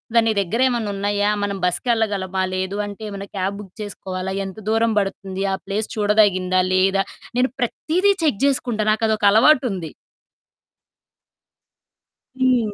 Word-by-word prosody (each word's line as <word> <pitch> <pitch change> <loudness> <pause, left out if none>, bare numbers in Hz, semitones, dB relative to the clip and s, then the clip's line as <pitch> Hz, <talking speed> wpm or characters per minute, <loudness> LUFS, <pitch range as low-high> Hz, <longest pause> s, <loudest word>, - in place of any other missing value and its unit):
దాని 225 -1 +4
దగ్గరేమన్నా 230 +3 0
ఉన్నాయా? 205 +1 0
మనం 200 -1 -2
బసుకెళ్లగలమా? 200 -2 0
లేదు 190 +2 -2
అంటే 205 +1 -9
ఏమన్నా 200 0 -7
క్యాబ్ 195 +2 -2
బుక్ 195 -3 -11
చేసుకోవాలా? 190 -2 -5
ఎంత 195 +2 -8
దూరం 225 0 +2
పడుతుంది? 195 -1 -4
ఆ - - +1
ప్లేస్ 205 +2 -2
చూడదగిందా 200 -3 +3
లేదా? 195 +1 +3 0.3
నేను 250 -1 +2
ప్రతీదీ 355 - +1
చెక్ 285 -10 +1
చేసుకుంటా. 240 -6 0
నాకదొక 220 -1 +1
అలవాటుంది. 220 - +3 2.5
హ్మ్. 245 -5 +2
205 Hz, 120 wpm, -21 LUFS, 195-225 Hz, 2.5 s, దాని